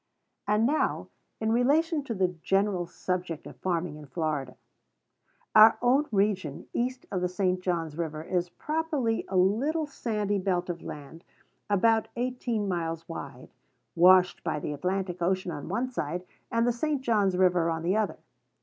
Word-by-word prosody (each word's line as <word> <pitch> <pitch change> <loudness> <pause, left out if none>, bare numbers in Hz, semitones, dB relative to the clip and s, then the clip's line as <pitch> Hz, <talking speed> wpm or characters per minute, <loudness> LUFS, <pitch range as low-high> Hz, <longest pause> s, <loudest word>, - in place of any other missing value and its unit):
And 210 +2 +3
now 300 +5 0 0.3
in 220 0 0
relation 290 +6 +2
to 230 - -3
the 185 -2 +2
general 185 +1 0
subject 180 -4 -4
of - - -10
farming 175 -4 -2
in 150 -1 -11
Florida. 145 -3 -3 1.0
Our 215 +1 +8
own 265 +5 +3
region 195 -8 0
east 250 +1 -2
of 185 - -1
the 180 - 0
St. 180 0 0
John's 165 -4 -2
River 155 -2 -4
is 175 +1 -1
properly 300 - -1
a 190 - -1
little 260 - +2
sandy 210 -7 -2
belt 180 -2 0
of 170 - -8
land, 150 +3 -9 0.5
about 220 +2 +3
eighteen 240 -3 -2
miles 165 -3 -3
wide, 135 -6 -8 0.5
washed 180 +1 +5
by - - -1
the 150 - -4
Atlantic 180 +3 -2
Ocean 185 +1 0
on 145 0 -6
one 230 +7 0
side, 180 - -4 0.3
and 230 0 +2
the 245 - +2
St. 290 +3 -1
John's 205 -6 +2
River 180 -2 +3
on 165 0 -2
the 180 +4 +1
other. 215 -1 0
185 Hz, 160 wpm, -28 LUFS, 170-230 Hz, 1.0 s, Our